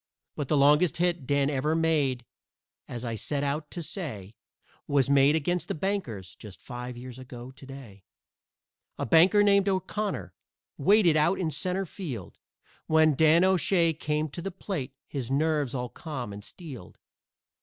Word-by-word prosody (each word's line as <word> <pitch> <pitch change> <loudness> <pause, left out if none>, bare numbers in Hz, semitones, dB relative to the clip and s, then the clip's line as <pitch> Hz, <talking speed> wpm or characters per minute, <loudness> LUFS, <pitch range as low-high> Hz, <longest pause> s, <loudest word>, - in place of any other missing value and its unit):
But 145 - -3
the 150 - +2
longest 150 +5 +4
hit 175 -5 0
Dan 140 -1 +2
ever 150 +3 0
made, 145 -7 +1 0.6
as 120 0 -6
I 115 - -3
set 140 +6 -3
out 145 +2 -2
to 170 - -6
say, 140 - -5 0.5
Was 140 -1 +2
made 140 +2 +5
against 175 +3 -1
the - - -3
Bankers 135 - -3
just 95 -5 -12
five 125 -1 -7
years 125 +1 -9
ago 125 -1 -9
to 135 +1 -14
day. 120 -8 -11 0.9
A - - -2
banker 180 - +6
named 200 -1 +4
O'Connor 195 +2 -2 0.5
waited 195 -6 +5
out 170 +5 +3
in 165 -4 -1
centre 185 +6 -1
field 140 - -7 0.5
When 155 -1 +4
Dan 160 +4 +5
O'Shay 180 -2 +3
came 150 0 -2
to 170 - -6
the 195 - -3
plate, 175 -8 -5
his 130 -4 -5
nerves 145 -1 0
all 125 -1 -3
calm 130 -10 -6
and 100 0 -9
steeled. 135 - -10
150 Hz, 155 wpm, -27 LUFS, 130-170 Hz, 0.9 s, banker